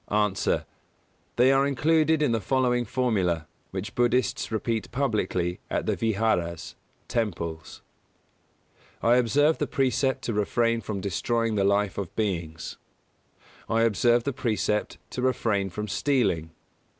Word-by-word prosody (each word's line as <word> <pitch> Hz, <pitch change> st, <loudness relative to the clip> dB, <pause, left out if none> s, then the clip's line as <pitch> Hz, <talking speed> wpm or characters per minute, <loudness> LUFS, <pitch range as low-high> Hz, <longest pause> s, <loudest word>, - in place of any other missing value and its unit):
_ 105 Hz, -2 st, +1 dB
A. -, -, -1 dB, 0.7 s
They 125 Hz, +2 st, +5 dB
are 135 Hz, +1 st, +3 dB
included 155 Hz, +2 st, +2 dB
in 145 Hz, -, +2 dB
the 115 Hz, -2 st, 0 dB
following 125 Hz, +2 st, +1 dB
formula,, 105 Hz, -10 st, 0 dB, 0.2 s
which 95 Hz, +2 st, -5 dB
Buddhists 120 Hz, 0 st, +1 dB
repeat 110 Hz, 0 st, -2 dB
publicly 95 Hz, -9 st, -1 dB
at -, -, -1 dB
the -, -, +1 dB
vihāras 95 Hz, -7 st, -1 dB, 0.3 s
(temples): 85 Hz, -8 st, -3 dB, 1.2 s
I 120 Hz, +2 st, +5 dB
observe 145 Hz, +6 st, +3 dB
the 150 Hz, -, 0 dB
precept 135 Hz, 0 st, 0 dB
to 115 Hz, -, -2 dB
refrain 115 Hz, +3 st, +1 dB
from 100 Hz, -4 st, -4 dB
destroying 115 Hz, +4 st, 0 dB
the 100 Hz, -2 st, +1 dB
life 100 Hz, 0 st, +1 dB
of 95 Hz, -4 st, -6 dB
beings. 85 Hz, -6 st, -3 dB, 0.9 s
I 115 Hz, 0 st, +2 dB
observe 115 Hz, +2 st, +3 dB
the 140 Hz, -, -2 dB
precept 105 Hz, -3 st, -1 dB
to 125 Hz, -, -4 dB
refrain 110 Hz, -6 st, +1 dB
from 105 Hz, +4 st, -5 dB
stealing. 100 Hz, -, +1 dB
115 Hz, 130 wpm, -26 LUFS, 100-125 Hz, 1.2 s, They